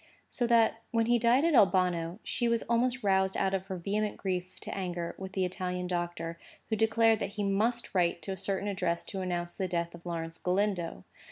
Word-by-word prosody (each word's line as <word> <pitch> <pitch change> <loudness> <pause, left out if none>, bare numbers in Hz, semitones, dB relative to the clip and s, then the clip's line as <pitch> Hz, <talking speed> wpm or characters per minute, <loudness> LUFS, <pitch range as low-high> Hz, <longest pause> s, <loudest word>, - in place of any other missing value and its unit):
So 240 - 0
that, 230 -1 +4
when 230 -1 +2
he 240 +1 +3
died 240 +6 +4
at 335 - +3
Albano, 180 - +3
she 240 - -1
was 235 -1 +2
almost 245 +1 +1
roused 190 -1 +2
out 195 0 +1
of 190 0 -2
her 190 -2 -4
vehement 205 +4 -1
grief 185 -1 -3
to - - -5
anger 175 -3 -3
with 190 0 -7
the 190 -1 +1
Italian 180 0 -3
doctor, 175 -2 -3 0.3
who 220 - +1
declared 225 0 +3
that 200 0 -3
he 205 - 0
must 220 +5 0
write 175 -2 +1
to 195 - -3
a - - -2
certain 195 +1 -1
address 180 -4 -1
to 195 - -5
announce 175 -1 -2
the 190 - -2
death 170 -1 -2
of 170 0 -12
Lawrence 165 -1 -4
Galindo. 180 - 0
190 Hz, 205 wpm, -30 LUFS, 175-220 Hz, 0.3 s, that